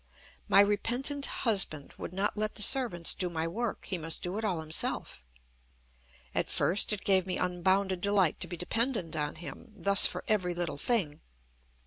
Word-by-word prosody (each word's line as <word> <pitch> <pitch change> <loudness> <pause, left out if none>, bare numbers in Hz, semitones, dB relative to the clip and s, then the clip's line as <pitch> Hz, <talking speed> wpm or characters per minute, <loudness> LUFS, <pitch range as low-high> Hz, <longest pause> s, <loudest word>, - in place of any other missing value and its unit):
My 200 - +6
repentant 245 +8 +1
husband 190 - +1
would - - -7
not 195 +3 -2
let 215 0 -3
the 210 - 0
servants 200 -10 +2
do 180 -2 -3
my 165 -1 -3
work; 230 +6 -5
he 185 -2 -3
must 160 0 -2
do 180 +4 -3
it - - -6
all 185 -6 -2
himself. 155 - -2 1.1
At - - -1
first 190 +4 +3
it 210 -2 -3
gave 190 -2 +2
me 185 - -3
unbounded 185 +1 -1
delight 200 -4 +1
to 180 - -1
be 175 0 -7
dependent 220 - -1
on 150 -1 -3
him 170 +6 -11
thus 200 +1 +6
for - - -6
every 185 -5 -1
little 175 -4 -3
thing. 175 -11 -1
190 Hz, 170 wpm, -29 LUFS, 170-210 Hz, 1.1 s, My